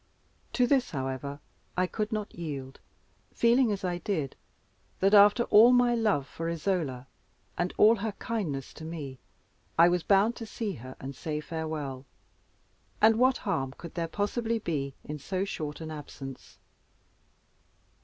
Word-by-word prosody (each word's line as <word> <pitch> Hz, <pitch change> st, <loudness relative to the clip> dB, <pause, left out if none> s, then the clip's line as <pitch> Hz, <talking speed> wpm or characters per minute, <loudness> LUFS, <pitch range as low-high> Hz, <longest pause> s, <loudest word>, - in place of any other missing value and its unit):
To 250 Hz, -, +3 dB
this, 260 Hz, 0 st, +2 dB
however, 135 Hz, 0 st, -4 dB, 0.4 s
I 185 Hz, -, +3 dB
could 210 Hz, +4 st, -3 dB
not 215 Hz, -1 st, -3 dB
yield, 140 Hz, -6 st, -6 dB, 0.6 s
feeling, 235 Hz, 0 st, +4 dB
as 200 Hz, -2 st, -3 dB
I 175 Hz, -1 st, -1 dB
did, 160 Hz, -7 st, -2 dB, 0.6 s
that, 195 Hz, +2 st, +3 dB
after 205 Hz, +3 st, +7 dB
all 230 Hz, +2 st, +7 dB
my 245 Hz, -1 st, +4 dB
love 215 Hz, -, +1 dB
for 165 Hz, +6 st, -5 dB
Isola, 160 Hz, -7 st, -1 dB, 0.5 s
and 175 Hz, +1 st, -1 dB
all 220 Hz, +2 st, +6 dB
her 210 Hz, +1 st, -3 dB
kindness 175 Hz, -, -3 dB
to -, -, -11 dB
me, 150 Hz, -5 st, -6 dB, 0.6 s
I 170 Hz, +1 st, +7 dB
was 175 Hz, 0 st, +1 dB
bound 200 Hz, +6 st, +3 dB
to 225 Hz, -, -7 dB
see 215 Hz, -1 st, -3 dB
her 130 Hz, -2 st, -9 dB
and 135 Hz, +1 st, -7 dB
say 150 Hz, +2 st, -3 dB
farewell; 150 Hz, -4 st, -5 dB, 0.9 s
and 220 Hz, +1 st, +6 dB
what 255 Hz, +1 st, +4 dB
harm 135 Hz, -1 st, -1 dB
could 170 Hz, +3 st, -10 dB
there 170 Hz, -1 st, -2 dB
possibly 225 Hz, +5 st, -1 dB
be 140 Hz, -9 st, -3 dB
in 150 Hz, 0 st, -6 dB
so 190 Hz, +6 st, -2 dB
short 155 Hz, -5 st, -5 dB
an 160 Hz, -1 st, -6 dB
absence? 140 Hz, -3 st, -9 dB
170 Hz, 150 wpm, -29 LUFS, 145-215 Hz, 0.9 s, after